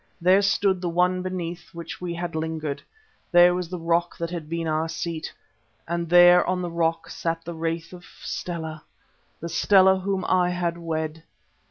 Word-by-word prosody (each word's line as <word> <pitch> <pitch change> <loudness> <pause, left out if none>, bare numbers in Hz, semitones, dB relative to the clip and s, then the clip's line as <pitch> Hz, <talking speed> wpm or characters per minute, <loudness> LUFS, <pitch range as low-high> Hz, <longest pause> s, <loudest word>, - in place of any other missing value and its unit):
There 185 +3 +5
stood 200 -2 +1
the 175 - -1
one 180 +2 +1
beneath 175 -1 -5
which 170 +1 -7
we 175 -1 -4
had 175 0 -4
lingered, 155 -3 -3 0.5
there 175 0 +7
was 180 -2 -3
the 180 - -4
rock 170 +1 0
that 170 0 -4
had 165 -4 -6
been 165 0 -2
our 160 +1 0
seat, 165 -1 -4 0.6
and 170 0 -2
there 175 0 +7
on 180 0 -1
the 175 - -4
rock 165 0 0
sat 165 0 -3
the 170 - -5
wraith 165 +1 -4
of 180 -1 -11 0.2
Stella, 160 -3 -5 0.6
the 170 - -4
Stella 190 +2 +4
whom 190 -1 -2
I 180 -1 +2
had 175 -1 -2
wed! 160 -1 -3
170 Hz, 175 wpm, -24 LUFS, 165-180 Hz, 0.6 s, there